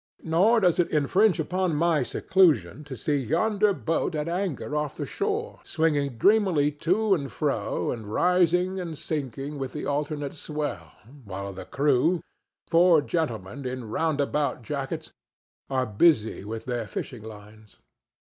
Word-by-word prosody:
Nor 195 +8 +3
does 180 -3 +3
it 175 - +3
infringe 175 +6 +3
upon 180 +1 0
my 165 -1 +2
seclusion 150 - +2
to 140 -3 -7
see 145 +5 0
yonder 200 - +2
boat 165 -2 -1
at 150 +1 -2
anchor 170 -4 -2
off 150 -1 -2
the 145 - -3
shore 430 - -3
swinging 145 -6 0
dreamily 190 - +3
to 190 +8 +1
and 140 -8 -2
fro - - -1
and 110 -3 -6
rising 180 - +2
and 165 -4 -5
sinking 140 -1 -4
with 135 -1 -4
the 150 - -4
alternate 145 0 -2
swell, 145 - -5 0.3
while 100 -1 -6
the 95 - -8
crew—four 165 +3 +2
gentlemen 135 - -3
in 125 -3 -5
roundabout 145 -3 0
jackets—are 135 0 -5
busy 110 - +2
with 110 +2 -6
their 120 -3 -3
fishing 115 +4 -6
lines. 105 0 -13
150 Hz, 135 wpm, -26 LUFS, 125-175 Hz, 0.3 s, Nor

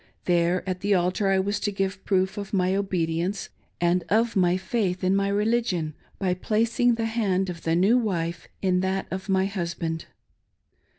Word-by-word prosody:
There 175 +1 +2
at 185 -1 -2
the 200 +1 +2
altar 185 +3 +1
I 195 0 +3
was 200 +2 0
to 205 - -1
give 195 -1 -2
proof 190 0 +1
of 205 0 -6
my 185 -1 +2
obedience 185 -1 -1 0.3
and 175 +1 +2
of 225 +4 +2
my 180 -1 +3
faith' 185 -1 -1
in 185 +1 +3
my 195 0 +2
religion, 205 -6 0 0.2
by 185 -2 0
placing 230 +5 +1
the 225 0 -1
hand 195 -5 0
of 170 -1 -9
the 165 0 +1
new 200 +8 +4
wife 170 -7 -2 0.2
in 185 -1 +3
that 190 +1 -1
of 190 +1 -5
my 190 0 +3
husband. 170 -4 -3
190 Hz, 175 wpm, -25 LUFS, 180-205 Hz, 0.3 s, new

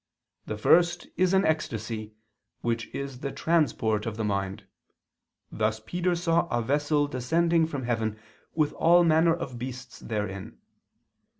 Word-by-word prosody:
The 110 - -3
first 175 +8 +3
is 185 0 +2
an 190 - +3
ecstasy, 110 -8 -2 0.5
which 115 -1 -1
is 140 -2 -6
the 140 0 -4
transport 120 -10 +1
of 110 -1 -4
the 110 - -2
mind: 100 0 -2 0.9
thus 110 0 0
Peter 175 +10 -1
saw 170 0 +1
a 120 - 0
vessel 145 +4 +1
descending 160 +5 +1
from 145 -5 -4
heaven 115 -3 -1 0.4
with 155 -2 +1
all 175 +2 +5
manner 165 0 +4
of 125 -7 -6
beasts 125 0 -7
therein. 105 -4 -4
130 Hz, 135 wpm, -27 LUFS, 110-165 Hz, 0.9 s, all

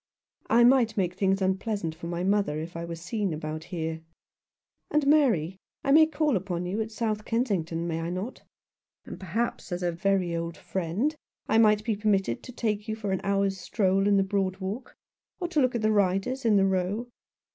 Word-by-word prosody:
" - - -50
I 235 +2 +6
might 240 -3 +4
make 180 -3 +1
things 195 +1 +1
unpleasant 190 -2 -1
for 170 +1 -8
my 170 +1 -3
mother 195 -6 +1
if 165 +2 -7
I 170 0 -4
were 170 0 -5
seen 185 +1 -2
about 155 +1 -5
here. 160 -2 -4 0.9
And, 300 -1 +2
Mary, 225 - +3 0.2
I 275 - +1
may 315 +2 +7
call 310 -4 +1
upon 180 -2 -2
you' 195 +5 -2
at 220 - -3
South 215 -1 -2
Kensington, 185 -9 -1
may 165 -1 -2
I 165 - -3
not? 185 +8 -5 0.6
And - - -8
perhaps, 205 +4 -3
as 175 +1 -3
a 175 - +1
very 180 0 0
old 170 0 -4
friend, 190 - -2 0.3
I 225 - +3
might 210 -1 +4
be 225 -3 +1
permitted 200 - 0
to 250 - -10
take 215 -3 -2
you 220 - -2
for 210 -3 -4
an 190 - -1
hour's 195 -1 +1
stroll 195 +1 +1
in 205 -1 +4
the 195 - +4
Broad 190 -1 -1
Walk 200 +7 -5 0.2
— - - -58
or 355 - -2
to 310 -4 +2
look 255 -1 +2
at 230 - -1
the 215 - +3
riders 205 +6 +1
in 220 -2 +4
the 195 -1 +5
Row." 190 +5 0
195 Hz, 205 wpm, -27 LUFS, 175-225 Hz, 0.9 s, may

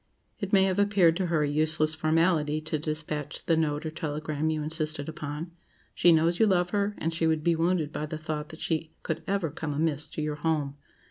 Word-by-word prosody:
It 200 -2 -4
may 195 -2 +6
have 190 0 +1
appeared 195 -5 +4
to 185 -2 0
her 165 -3 +1
a - - +1
useless 155 +1 +2
formality 155 -1 +2
to 155 0 -2
despatch 155 -1 -4
the 165 - +3
note 155 -1 0
or 155 - -3
telegram 155 0 -2
you 155 -1 -1
insisted 155 -1 -1
upon. 155 +1 -5 0.4
She 175 - +5
knows 165 +2 +3
you 220 - +5
love 180 -2 +2
her, 205 0 0
and 165 +1 -2
she 165 0 +1
would 160 -1 +1
be 170 0 +3
wounded 165 -2 +1
by 155 - -3
the 155 - -4
thought 155 -1 -4
that 160 - -11
she 160 -1 -2
could 160 +1 -2
ever 195 -6 0
"come 150 -2 -4
amiss" 155 0 0
to - - -5
your 150 -1 -2
home. 150 -3 -1
160 Hz, 215 wpm, -28 LUFS, 150-170 Hz, 0.4 s, may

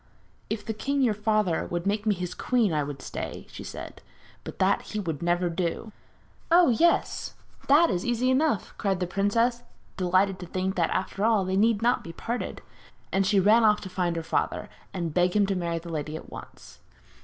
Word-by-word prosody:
'If 220 -2 -3
the 220 - -2
king, 275 +5 0
your 235 -4 +3
father, 210 -4 0
would 175 +1 -3
make 205 +2 -1
me 210 - +3
his 180 0 -4
queen 230 -6 +1
I 150 - +1
would 145 -1 -6
stay,' - - -6
she - - -8
said; - - -8 0.4
'but - - -8
that 190 +1 +2
he 215 - -5
would 165 -7 -3
never 175 +1 +1
do.' 175 +5 -3 0.6
'Oh, 345 -2 +6
yes! 335 +9 +1 0.3
that 305 +5 +5
is 175 - -1
easy 245 +2 +1
enough!' 270 -4 +1
cried 195 -3 0
the 180 - 0
princess, 230 +6 +1 0.4
delighted 185 +1 +2
to 180 - -7
think 185 +2 -2
that, 175 -3 +1
after 190 +2 -2
all, 220 -4 +3
they 185 +1 -1
need 220 +2 +3
not 245 +1 +2
be 165 - -8
parted. 235 +7 -4 0.5
And 195 0 +2
she 200 -1 +4
ran 215 +5 +5
off 210 -1 +5
to 190 - -7
find 180 -2 -1
her 165 - -3
father, 160 - -1 0.2
and 170 -4 -3
beg 180 +2 +2
him 205 -1 +4
to 195 0 -1
marry 170 -2 -2
the 170 +1 -8
lady 155 -1 -4
at 160 - -9
once. - - -11
195 Hz, 200 wpm, -27 LUFS, 175-225 Hz, 0.6 s, Oh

